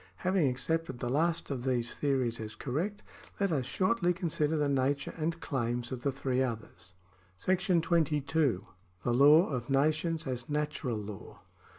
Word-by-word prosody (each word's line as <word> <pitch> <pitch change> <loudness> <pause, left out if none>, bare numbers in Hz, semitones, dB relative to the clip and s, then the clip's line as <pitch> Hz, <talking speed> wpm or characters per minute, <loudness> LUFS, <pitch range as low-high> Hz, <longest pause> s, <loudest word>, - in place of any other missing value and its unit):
Having 185 -6 +3
accepted 150 +2 -2
the 120 0 -3
last 165 +3 +1
of 130 -3 -3
these 125 -2 0
theories 130 -5 0
as 110 -1 -6
correct, 170 +11 -3 0.4
let 200 -2 +1
us 135 -5 0
shortly 185 -3 +1
consider 160 -3 0
the 150 -1 +2
nature 140 +1 0
and 165 +1 -2
claims 120 -4 -2
of 130 -2 -4
the 140 - 0
three 130 -1 -1
others. 110 -7 -4 0.5
§ 185 - +2
22. 150 - +1 0.4
The 120 - +1
Law 145 +7 +7
of 125 -5 -4
Nations 155 +4 +1
as 125 -1 -4
Natural 150 -5 -1
Law. 105 -1 -8
140 Hz, 155 wpm, -31 LUFS, 125-165 Hz, 0.5 s, Law